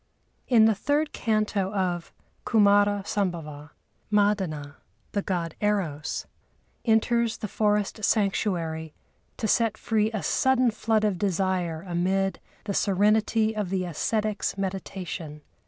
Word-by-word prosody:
In 230 Hz, -4 st, +6 dB
the 220 Hz, -, +5 dB
third 290 Hz, +9 st, 0 dB
canto 215 Hz, -4 st, 0 dB
of 175 Hz, -3 st, -1 dB, 0.3 s
Kumâra 205 Hz, -2 st, +4 dB
Sambhava, 160 Hz, -8 st, -3 dB, 0.4 s
Madana, 190 Hz, -9 st, +1 dB, 0.3 s
the 200 Hz, -, 0 dB
God 175 Hz, -4 st, -2 dB
Eros, 185 Hz, -8 st, -1 dB, 0.6 s
enters 230 Hz, 0 st, +2 dB
the 215 Hz, -, -4 dB
forest 210 Hz, +1 st, 0 dB
sanctuary 170 Hz, -7 st, 0 dB, 0.4 s
to 220 Hz, -, -1 dB
set 220 Hz, 0 st, +2 dB
free 215 Hz, -1 st, +1 dB
a 215 Hz, -3 st, -3 dB
sudden 255 Hz, -2 st, +3 dB
flood 220 Hz, 0 st, 0 dB
of 205 Hz, -4 st, 0 dB
desire 185 Hz, -3 st, -1 dB
amid 190 Hz, +2 st, 0 dB, 0.2 s
the 205 Hz, -, -3 dB
serenity 215 Hz, +3 st, +2 dB
of 210 Hz, -4 st, -2 dB
the 185 Hz, -1 st, -1 dB
ascetics' 210 Hz, +5 st, -1 dB
meditation. 185 Hz, -5 st, -5 dB
200 Hz, 115 wpm, -26 LUFS, 180-215 Hz, 0.6 s, In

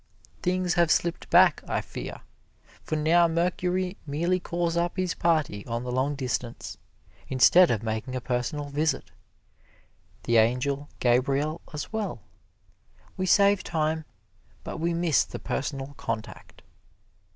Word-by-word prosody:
Things 180 Hz, -1 st, 0 dB
have 170 Hz, -2 st, +3 dB
slipped 170 Hz, +1 st, 0 dB
back, -, -, +6 dB
I -, -, 0 dB
fear -, -, -7 dB
me, -, -, -14 dB, 0.6 s
for 155 Hz, -, -3 dB
now 165 Hz, +3 st, +4 dB
Mercury 180 Hz, +2 st, -1 dB
merely 170 Hz, +6 st, 0 dB
calls 170 Hz, -1 st, -2 dB
up 175 Hz, +2 st, -1 dB
his 185 Hz, -2 st, 0 dB
party 155 Hz, -12 st, 0 dB
on 115 Hz, 0 st, -3 dB
the 125 Hz, -, -4 dB
long 130 Hz, +3 st, 0 dB
distance, 125 Hz, -3 st, -4 dB, 0.5 s
instead 170 Hz, +7 st, +6 dB
of 115 Hz, -2 st, 0 dB
making 110 Hz, +3 st, -3 dB
a -, -, -1 dB
personal 125 Hz, +4 st, -2 dB
visit 150 Hz, 0 st, -1 dB, 1.1 s
the 120 Hz, -, +2 dB
Angel 125 Hz, +6 st, +1 dB
Gabriel 135 Hz, +6 st, +1 dB
as 150 Hz, +7 st, -6 dB
well. 205 Hz, -, -3 dB, 0.9 s
We 185 Hz, -, -2 dB
save 200 Hz, +1 st, +4 dB
time, 160 Hz, -1 st, -1 dB, 0.6 s
but -, -, -6 dB
we 170 Hz, +2 st, 0 dB
miss 170 Hz, -3 st, +3 dB
the -, -, -8 dB
personal 140 Hz, 0 st, -4 dB
contact. 115 Hz, -1 st, -6 dB
155 Hz, 135 wpm, -27 LUFS, 130-175 Hz, 1.1 s, back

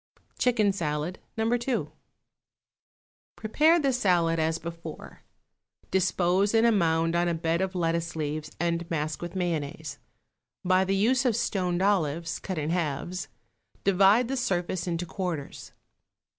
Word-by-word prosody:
=Chicken 220 Hz, -5 st, +3 dB
Salad, 155 Hz, 0 st, -3 dB, 0.2 s
No. 220 Hz, -, +1 dB
2.= 240 Hz, +1 st, -1 dB, 1.4 s
Prepare 310 Hz, +10 st, +3 dB
the 275 Hz, -4 st, +1 dB
salad 175 Hz, -8 st, +2 dB
as 160 Hz, +1 st, +1 dB
before; 165 Hz, -1 st, -9 dB, 0.7 s
dispose 190 Hz, +2 st, +2 dB
in 225 Hz, +1 st, +5 dB
a 235 Hz, -, +5 dB
mound 165 Hz, -4 st, +2 dB
on 175 Hz, 0 st, +2 dB
a 170 Hz, -, 0 dB
bed 165 Hz, +1 st, 0 dB
of 190 Hz, 0 st, -2 dB
lettuce 170 Hz, -1 st, -1 dB
leaves 155 Hz, 0 st, -3 dB
and 170 Hz, 0 st, -1 dB
mask 155 Hz, -1 st, -2 dB
with 175 Hz, +1 st, -6 dB
mayonnaise. 155 Hz, -4 st, -3 dB, 0.7 s
By 185 Hz, +1 st, +3 dB
the 195 Hz, +1 st, 0 dB
use 250 Hz, +7 st, +3 dB
of 245 Hz, -5 st, +2 dB
stoned 185 Hz, -6 st, 0 dB
olives, 165 Hz, -4 st, 0 dB
cut 185 Hz, -, -5 dB
in 155 Hz, +1 st, -1 dB
halves, 175 Hz, +1 st, -2 dB, 0.6 s
divide 200 Hz, +5 st, +4 dB
the 270 Hz, +2 st, -2 dB
surface 185 Hz, -6 st, -1 dB
into 170 Hz, 0 st, -2 dB
quarters. 175 Hz, -6 st, -5 dB
175 Hz, 135 wpm, -27 LUFS, 165-200 Hz, 1.4 s, in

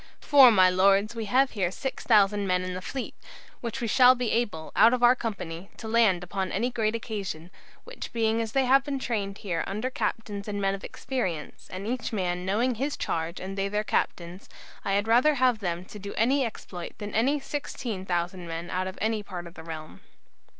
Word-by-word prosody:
For, 275 Hz, -4 st, +7 dB
my 190 Hz, -5 st, +6 dB
Lords, 195 Hz, +4 st, +3 dB
we 225 Hz, -2 st, -4 dB
have 260 Hz, +6 st, +3 dB
here 190 Hz, -5 st, 0 dB
6000 205 Hz, -3 st, +2 dB
men 180 Hz, 0 st, +1 dB
in 185 Hz, 0 st, -4 dB
the 185 Hz, -, -5 dB
fleet, 265 Hz, +6 st, -5 dB, 0.5 s
which 240 Hz, +2 st, -5 dB
we 235 Hz, -, -1 dB
shall 255 Hz, +2 st, +6 dB
be 245 Hz, -3 st, -1 dB
able, 205 Hz, -10 st, -1 dB
out 230 Hz, +4 st, +6 dB
of 245 Hz, -, -4 dB
our 245 Hz, +1 st, +7 dB
company, 195 Hz, -7 st, -5 dB
to 225 Hz, -, -7 dB
land 220 Hz, -6 st, +3 dB
upon 185 Hz, +1 st, -3 dB
any 240 Hz, +6 st, 0 dB
great 225 Hz, -2 st, 0 dB
occasion, 195 Hz, -7 st, -5 dB, 0.3 s
which -, -, -8 dB
being 225 Hz, -1 st, +1 dB
as 225 Hz, -1 st, -4 dB
they 270 Hz, -1 st, +3 dB
have 270 Hz, +2 st, +5 dB
been 280 Hz, -1 st, -3 dB
trained 205 Hz, -6 st, -3 dB
here 170 Hz, -5 st, -2 dB
under 215 Hz, +6 st, -3 dB
captains 205 Hz, -5 st, -3 dB
and 205 Hz, -1 st, -3 dB
men 195 Hz, -1 st, +1 dB
of 195 Hz, -, -6 dB
experience, 185 Hz, -, -4 dB
and 185 Hz, +2 st, -6 dB
each 240 Hz, +2 st, -3 dB
man 180 Hz, -3 st, -2 dB
knowing 235 Hz, +6 st, +1 dB
his 275 Hz, +6 st, -2 dB
charge 165 Hz, +1 st, -2 dB
and 190 Hz, +1 st, -6 dB
they 195 Hz, 0 st, -1 dB
their 210 Hz, +1 st, -1 dB
captains, 175 Hz, -3 st, -2 dB, 0.3 s
I 195 Hz, -, -1 dB
had 200 Hz, +2 st, +1 dB
rather 250 Hz, +7 st, +4 dB
have 250 Hz, -3 st, +3 dB
them 175 Hz, -2 st, -3 dB
to 210 Hz, -, -10 dB
do 200 Hz, +1 st, -7 dB
any 265 Hz, +5 st, +3 dB
exploit 180 Hz, -6 st, -7 dB
than 205 Hz, 0 st, -6 dB
any 270 Hz, +7 st, +2 dB
16,000 185 Hz, -, -3 dB
men 165 Hz, +1 st, -5 dB
out 185 Hz, +1 st, -1 dB
of 190 Hz, -, -7 dB
any 220 Hz, 0 st, 0 dB
part 180 Hz, -3 st, -7 dB
of 170 Hz, -, -11 dB
the 160 Hz, -, -10 dB
realm." 160 Hz, -1 st, -8 dB
205 Hz, 205 wpm, -27 LUFS, 185-240 Hz, 0.5 s, For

